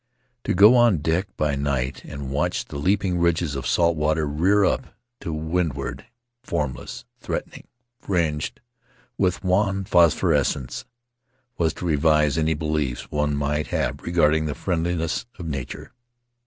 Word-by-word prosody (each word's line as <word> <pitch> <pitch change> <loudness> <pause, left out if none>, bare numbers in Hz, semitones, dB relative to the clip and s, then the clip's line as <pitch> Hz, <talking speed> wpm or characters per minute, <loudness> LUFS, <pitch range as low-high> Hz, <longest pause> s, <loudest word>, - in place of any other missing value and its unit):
To - - 0
go 105 +6 +8
on 120 -6 +5
deck 80 +5 0
by 75 -1 +1
night 70 -2 -2
and 70 -2 -7
watch 70 +2 -1
the 70 - -7
leaping 95 +2 +1
ridges 85 -3 +1
of 70 -1 -4
salt 85 -1 +3
water 75 +1 +1
rear 90 +8 +3
up 125 - -1 0.2
to 85 - -5
windward 75 -5 -2 0.2
— 120 0 -57
formless, 70 -7 -4
threatening, - - -5 0.3
fringed 80 -6 -1 0.6
with 90 0 +1
wan 95 +1 +1
phosphorescence 85 -6 +2 0.3
— 125 -1 -47
was 80 -2 +1
to - - -6
revise 75 -2 +3
any 80 0 +1
beliefs 75 -5 -2
one 75 0 0
might 75 +1 -1
have - - -1
had - - -20
regarding 80 -2 +2
the 75 - -3
friendliness 85 +1 -1
of 90 - -7
nature. 70 -5 -6
80 Hz, 145 wpm, -23 LUFS, 75-90 Hz, 0.6 s, go